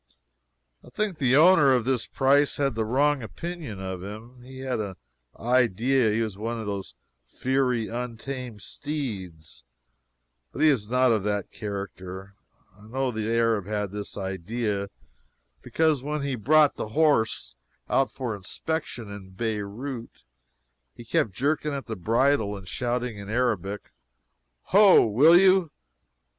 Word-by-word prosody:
I - - -14
think 210 -6 -2
the 130 -2 +3
owner 155 -4 +6
of 125 -3 +1
this 130 -2 0
prize 140 +2 +2
had 140 -4 0
a 110 - 0
wrong 140 +5 +2
opinion 155 - -6
about 95 -1 -5
him. 110 +6 -9
He 130 +1 -11
had 130 -3 -2
an 100 -3 -4 0.4
idea 125 +1 +2
that 105 - 0
he 115 - +1
was 105 -3 -5
one 115 +2 -3
of 110 - -5
those 100 -2 -5 0.3
fiery, 125 - 0
untamed 120 -1 -6
steeds, 95 - -6 0.9
but - - -2
he 155 - +7
is 110 -8 0
not 125 0 +3
of 110 -2 +2
that 105 -2 -2
character. 100 -2 -7 0.4
I 105 +1 -16
know 130 +2 -1
the 110 -1 -3
Arab 115 -4 +1
had 105 -2 -2
this 105 0 -6
idea, 100 +2 -3 0.7
because 160 - +1
when 150 +1 -3
he 140 -1 -2
brought 145 +6 +4
the - - -3
horse 150 -8 +2 0.3
out 135 - +2
for 125 -5 -4
inspection 120 - -4
in 95 -2 -10
Beirout, 115 +4 -5 0.7
he 120 - -11
kept 110 -2 0
jerking 145 +4 0
at 135 - -5
the 110 - -5
bridle 110 +1 +1
and 95 -1 -12
shouting 120 +1 -2
in 100 0 -8
Arabic, 105 -4 -1 0.7
"Ho! 200 0 +6
will 140 +11 +6
you? 190 -2 +5
120 Hz, 145 wpm, -26 LUFS, 105-135 Hz, 0.9 s, he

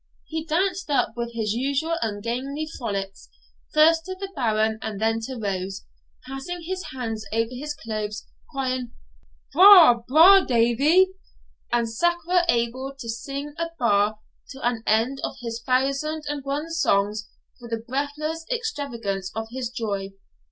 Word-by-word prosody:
He 320 -1 -4
danced 360 +3 0
up 280 -5 +1
with 235 0 -4
his 220 -3 -1
usual 280 +7 0
ungainly 235 +7 -3
frolics, 195 -5 -5 0.4
first 325 +2 +5
to 375 - -5
the 390 +1 -7
Baron 220 -4 +1
and 210 -3 -5
then 225 +1 +1
to 260 - -6
Rose, 195 -2 -4 0.4
passing 270 +7 -6
his 370 +2 -4
hands 225 -6 -4
over 225 +1 0
his 295 +4 -5
clothes, 215 -4 -5 0.2
crying, 255 -3 -3 0.6
'Bra', 355 -8 +9
bra' 335 +9 +8
Davie,' 275 +10 +4 0.6
and 240 -1 +2
scarce 345 +10 +1 0.3
able 255 +3 0
to 250 -4 -8
sing 275 +6 -5
a 335 0 -1
bar 210 -3 +2 0.3
to 270 -3 -3
an 240 -2 -1
end 230 +5 +2
of - - -3
his 230 -1 -5
thousand 275 +5 0
and 290 -1 -3
one 290 +4 -3
songs 210 -9 +1 0.3
for 240 -1 -10
the 230 - -1
breathless 295 +5 -3
extravagance 235 - -3
of 225 0 -4
his 250 -1 -3
joy. 200 -5 -4
255 Hz, 145 wpm, -24 LUFS, 225-305 Hz, 0.6 s, Bra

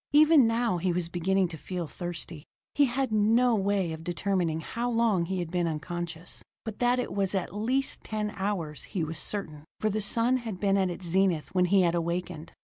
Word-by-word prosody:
Even 300 -4 +7
now 230 -5 +1
he 180 +1 +1
was 170 -1 -1
beginning 185 +2 +1
to 165 - -7
feel 180 +1 -4
thirsty. 170 -2 -6 0.3
He 290 - +4
had 260 -1 -1
no 225 +4 +4
way 195 -4 +1
of 160 0 -8
determining 175 -2 -1
how 235 +8 -3
long 225 -7 +2
he 190 +2 -2
had 175 -2 -3
been 175 -1 +1
unconscious, 165 +2 -5 0.2
but 220 -2 -6
that 245 0 +3
it 250 - -2
was 195 -1 0
at 190 -1 -2
least 255 +6 0
ten 210 -1 -3
hours, 190 -7 -3
he 180 - -3
was 160 0 -4
certain, 155 -6 -4 0.2
for 215 - +1
the 215 +2 -1
sun 230 +5 +3
had 225 -7 -6
been 195 -1 +2
at 190 -2 +2
its 175 +1 -6
zenith 175 -4 +1
when 180 -1 +3
he 190 +1 +4
had 170 -1 +2
awakened. 170 -1 -3
190 Hz, 205 wpm, -28 LUFS, 170-215 Hz, 0.3 s, Even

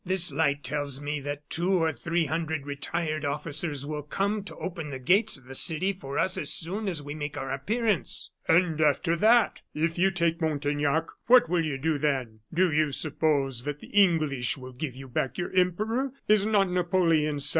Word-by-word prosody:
This 185 -3 +2
light 145 -1 +1
tells 145 -2 -2
me 145 +1 -3
that 145 +1 -6
two 175 +3 0
or 165 -3 +2
three 165 +6 -1
hundred 160 -1 -2
retired 155 +2 -3
officers 145 0 -3
will 150 0 -4
come 200 +8 -1
to - - -8
open 165 -4 -5
the 135 - -5
gates 190 - +2
of 135 - -18
the 135 - -9
city 175 +8 +1
for 140 -7 -7
us 185 - +1
as - - -2
soon 195 +6 -2
as 160 -5 -3
we 145 +1 -6
make 145 -1 -5
our 135 -1 -4
appearance." 210 - -1 0.2
"And 165 -2 +3
after 155 +3 +2
that! 225 +6 +4
If 165 +2 -1
you 190 +2 +5
take 170 -2 0
Montaignac, 145 0 0 0.2
what 250 -5 +7
will 175 -1 +2
you 150 -4 -2
do 150 +1 0
then? 130 -7 -1
Do 180 +1 +2
you 155 -1 +2
suppose 140 -4 0
that 145 0 -3
the - - -13
English 155 - +2
will 130 -1 -10
give 130 0 -5
you 135 0 -9
back 125 0 -2
your 175 - -3
Emperor? 215 +9 +1 0.2
Is 210 -1 +4
not 200 -4 +3
Napoleon 170 -4 +2
II. 145 - -4
155 Hz, 195 wpm, -27 LUFS, 145-180 Hz, 0.2 s, what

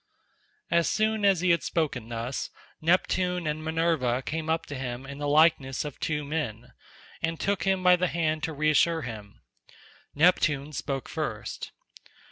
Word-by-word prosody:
As 170 -1 +3
soon 215 0 +1
as 195 -4 +4
he 180 -1 +3
had 170 -3 +3
spoken 130 -7 -2
thus, 120 +3 -3 0.3
Neptune 180 +1 +1
and 155 +1 -2
Minerva 160 -6 +1
came 160 +2 -3
up 160 0 0
to 145 - -7
him 130 0 -5
in 140 +1 -8
the 145 - -2
likeness 145 -3 +3
of 145 - -7
two 150 -1 -1
men, 125 -6 -4 0.5
and 165 0 -1
took 200 0 0
him 190 -1 +1
by 180 0 +7
the 180 +1 +1
hand 155 -2 0
to 160 - -4
reassure 155 +2 +2
him. 105 -4 -9 0.7
Neptune 150 -3 +3
spoke 135 -1 -3
first. - - -4
155 Hz, 155 wpm, -27 LUFS, 135-170 Hz, 0.7 s, by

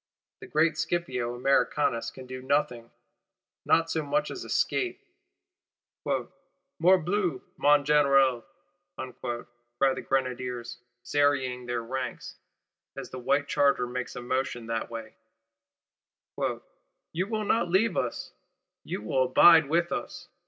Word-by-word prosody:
The - - -10
great 155 0 +2
Scipio 140 -8 -2
Americanus 130 -1 +1
can 130 - -11
do 130 0 -7
nothing; 125 -4 -1 0.8
not 165 0 +3
so 160 - 0
much 155 - -1
as - - -6
escape. 370 -1 -1 1.1
'Morbleu, 180 - 0 0.2
mon 145 -1 +4
Général,' 135 -4 +4 1.3
cry 135 +1 +3
the - - -5
Grenadiers 125 -3 -2 0.2
serrying 130 -2 +1
their 120 -1 -2
ranks 130 +2 -5 0.6
as - - -7
the 130 - -6
white 140 +3 +1
charger 140 -3 +2
makes 125 +1 -5
a 125 - -6
motion 125 -1 -2
that 115 0 -3
way, 115 -2 -7 2.0
'You 180 +4 -2
will 215 -1 -2
not 190 -4 +1
leave 200 +6 +2
us, 120 - -3 0.5
you - - -5
will 130 +4 +1
abide 160 +3 +7
with 170 +2 +1
us! 175 0 -5
135 Hz, 115 wpm, -28 LUFS, 125-165 Hz, 2.0 s, abide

